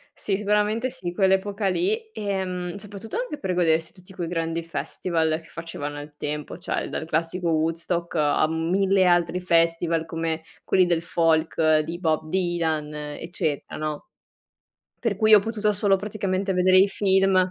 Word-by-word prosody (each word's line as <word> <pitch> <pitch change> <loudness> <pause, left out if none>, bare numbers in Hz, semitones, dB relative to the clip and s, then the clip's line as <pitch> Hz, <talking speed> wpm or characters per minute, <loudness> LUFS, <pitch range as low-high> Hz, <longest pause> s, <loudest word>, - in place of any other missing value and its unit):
Sì, 195 -2 -1
sicuramente 210 +4 +1
sì, 190 -9 -5
quell'epoca 195 +2 +1
lì. 425 - -1
Ehm, 185 -3 -3
soprattutto 205 - -7
anche - - -3
per 185 -2 -2
godersi 160 -2 +1
tutti 185 0 -16
quei 175 -3 -4
grandi 165 -1 -2
festival 165 -1 -1
che 165 - -19
facevano 150 -3 -6
al 145 0 -9
tempo, 150 +1 -4
cioè 180 - -3
dal - - -4
classico 165 +2 -1
Woodstock, 165 +2 -1
a 150 0 +3
mille 185 +4 +2
altri 175 0 +3
festival 165 -1 +2
come 165 0 -3 0.2
quelli 185 -1 +3
del 170 -2 +1
folk 160 -2 +2
di 165 +3 -4
Bob 155 -2 0
Dylan, 165 -4 -1
eccetera 150 +1 -4
no. 155 -1 -4 0.9
Per 225 -5 0
cui 215 +1 +6
ho 210 - +8
potuto 215 0 0
solo 200 -1 +3
praticamente 195 -1 -2
vedere 185 0 +5
i 195 +2 +6
film. 195 -1 +2
175 Hz, 150 wpm, -24 LUFS, 160-195 Hz, 0.9 s, ho